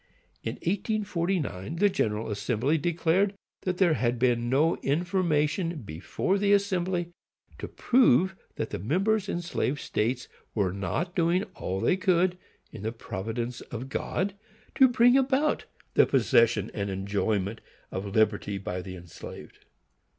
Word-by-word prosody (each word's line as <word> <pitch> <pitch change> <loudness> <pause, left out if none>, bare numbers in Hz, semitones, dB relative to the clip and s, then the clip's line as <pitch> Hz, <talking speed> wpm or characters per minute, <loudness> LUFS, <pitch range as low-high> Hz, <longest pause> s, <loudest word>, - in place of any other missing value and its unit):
In - - -3
1849 175 - -2
the 205 +5 +4
General 110 - -1
Assembly 125 +8 0
declared 175 +5 +1 0.3
that 185 -1 -2
there 180 -4 +4
had 120 -4 0
been 120 -1 +1
no 150 +6 +3
information 165 - 0
before 100 - -2
the 205 0 +3
Assembly 185 -3 0 0.5
to - - -4
prove 190 - +3 0.2
that 110 - -3
the 105 - -3
members 195 - +1
in 175 - -2
slave 145 -4 -1
states 120 +3 -1 0.3
were 95 -4 +1
not 100 - -2
doing 175 +2 +2
all 95 +1 -3
that - - -1
they 185 - +3
could, 185 -1 +2 0.3
in 110 - -9
the 110 +2 -2
providence 115 +2 -4
of 120 +3 -6
God, 190 +7 -2 0.4
to 265 - +7
bring 245 0 +5
about 270 +3 +2 0.3
the - - +5
possession 115 -5 +3
and 100 -1 -2
enjoyment 100 +2 -1 0.3
of 95 +2 -4
liberty 105 -2 +2
by 90 -1 -4
the 95 0 -8
enslaved. 85 -2 -10
150 Hz, 140 wpm, -28 LUFS, -, 0.5 s, to